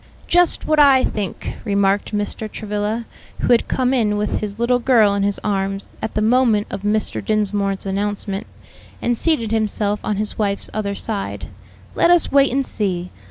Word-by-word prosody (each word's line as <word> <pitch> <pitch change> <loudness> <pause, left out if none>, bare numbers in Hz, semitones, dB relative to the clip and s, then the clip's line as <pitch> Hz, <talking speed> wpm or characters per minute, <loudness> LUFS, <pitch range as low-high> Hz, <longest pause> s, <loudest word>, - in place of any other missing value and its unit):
"Just 355 0 +3
what 310 0 +2
I 275 -3 +6
think," 205 -4 -4
remarked 200 -2 +1
Mr. 210 +1 -3
Travilla, 210 +2 -3 0.4
who - - 0
had 235 - +4
come 255 0 0
in 215 -5 +1
with 210 0 -1
his 205 -1 -5
little 240 +2 +2
girl 230 -5 +4
in 200 - 0
his 200 0 +1
arms 195 -1 -2
at 220 - -4
the 215 - +1
moment 225 -2 +3
of 195 - -5
Mr. 210 +1 -1
Dinsmore's 200 -2 -1
announcement, 200 0 -3 0.5
and 240 - 0
seated 235 -5 0
himself 210 -1 0
on 210 - -1
his 210 +2 -3
wife's 200 -2 -1
other 200 -2 -2
side; 205 -1 -4 0.4
"let - - +3
us 350 -2 +4
wait 280 0 +4
and 270 +1 0
see. 180 -6 -2
210 Hz, 170 wpm, -20 LUFS, 200-235 Hz, 0.5 s, I